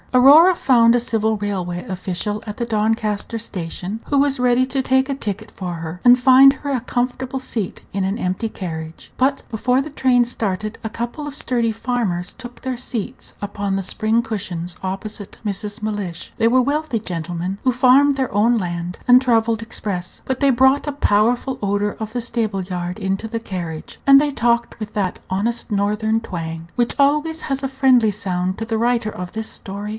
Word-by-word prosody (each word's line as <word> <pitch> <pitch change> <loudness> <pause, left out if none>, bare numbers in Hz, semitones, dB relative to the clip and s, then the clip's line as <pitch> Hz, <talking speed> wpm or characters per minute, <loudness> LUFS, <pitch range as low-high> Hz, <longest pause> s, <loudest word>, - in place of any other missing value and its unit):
Aurora 295 +8 +8
found 235 -6 +4
a 245 - +4
civil 220 -2 0
railway 185 -4 -3
official 195 +3 -3
at 210 -1 -6
the 235 - -1
Doncaster 220 0 -1
station, 190 +1 -5
who 285 - +1
was 275 -1 +2
ready 250 +1 +3
to 265 +1 -1
take 265 0 +2
a 275 - -2
ticket 205 -7 -4
for 180 -2 -5
her, 165 +2 -7
and 245 0 +7
find 265 +2 +8
her 285 +1 -5
a 255 -3 0
comfortable 255 +2 -2
seat 230 -6 -4
in 195 0 -1
an 195 +3 -1
empty 185 +2 -2
carriage; 160 -5 -7
but 270 +2 +1
before 250 +3 +1
the 290 +3 -3
train 250 -3 +3
started 215 -2 -3
a 220 - -3
couple 240 +7 -5
of 285 - -7
sturdy 235 -5 0
farmers 220 -6 -2
took 245 -2 -11
their 260 -1 -3
seats 245 0 -5
upon 200 -1 -2
the 195 - -1
spring 220 +4 +1
cushions 180 -6 -4
opposite 200 +2 -5
Mrs. 205 0 -4
Mellish. 205 -5 -4
They 225 - +2
were 255 +2 +4
wealthy 285 -3 -1
gentlemen, 175 0 -4
who 255 - +3
farmed 265 +3 +5
their 265 -2 -1
own 230 +4 +3
land, 175 -2 -3
and 250 0 +7
travelled 230 -3 +2
express; 200 -5 -4
but 260 -1 -2
they 280 - +5
brought 265 +3 +3
a - - 0
powerful 245 +1 +1
odor 205 0 0
of 220 0 -4
the 245 - -2
stable 220 -5 -1
yard 180 +1 -4
into 195 +2 -2
the 230 0 -3
carriage, 175 -7 -6
and 275 0 +8
they 295 0 +1
talked 235 -2 0
with 215 -1 -7
that 195 -3 -1
honest 220 +5 -2
Northern 210 +2 +1
twang 165 -6 -6
which 240 -1 0
always 300 +3 +2
has 275 -1 -3
a - - +1
friendly 260 -4 +4
sound 185 -3 -2
to 225 - -4
the 225 0 -1
writer 235 -2 +1
of 180 -2 -7
this 220 0 -4
story. 200 +2 -6
225 Hz, 190 wpm, -20 LUFS, 195-255 Hz, -, Aurora